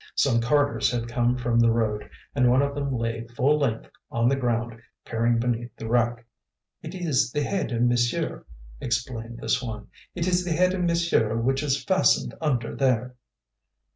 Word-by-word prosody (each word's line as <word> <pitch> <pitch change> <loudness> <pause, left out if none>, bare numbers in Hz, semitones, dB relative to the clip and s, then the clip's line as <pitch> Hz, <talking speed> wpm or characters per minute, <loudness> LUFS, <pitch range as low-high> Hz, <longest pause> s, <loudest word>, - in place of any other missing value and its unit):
Some 115 -4 +3
carters 145 -1 +2
had 120 -1 -2
come 120 +1 +1
from 120 -2 +1
the 115 0 +5
road 110 -2 -1 0.2
and 125 -3 +3
one 130 +3 +4
of 140 0 -1
them 140 -1 -2
lay 115 -2 -3
full 145 +5 +3
length 115 -6 -2 0.2
on 115 0 +1
the 135 - +3
ground 120 -3 -2 0.2
peering 115 +1 +1
beneath 120 0 -2
the 115 - -7
wreck. 120 0 +1 0.6
"It 160 +4 -8
is 145 -10 +1
the 145 +2 -1
head 190 -2 -2
of 120 0 0
monsieur," 120 -1 0 0.4
explained 120 -1 -3
this - - 0
one; 110 -4 -6 0.3
"it 170 -2 -1
is 180 0 +1
the 175 -2 -1
head 180 +3 +3
of 185 - -2
monsieur 170 -10 +1
which 135 +4 +1
is 140 -2 0
fastened 190 -1 +2
under 125 -7 -1
there." 125 -2 +1
120 Hz, 175 wpm, -25 LUFS, 115-140 Hz, 0.6 s, the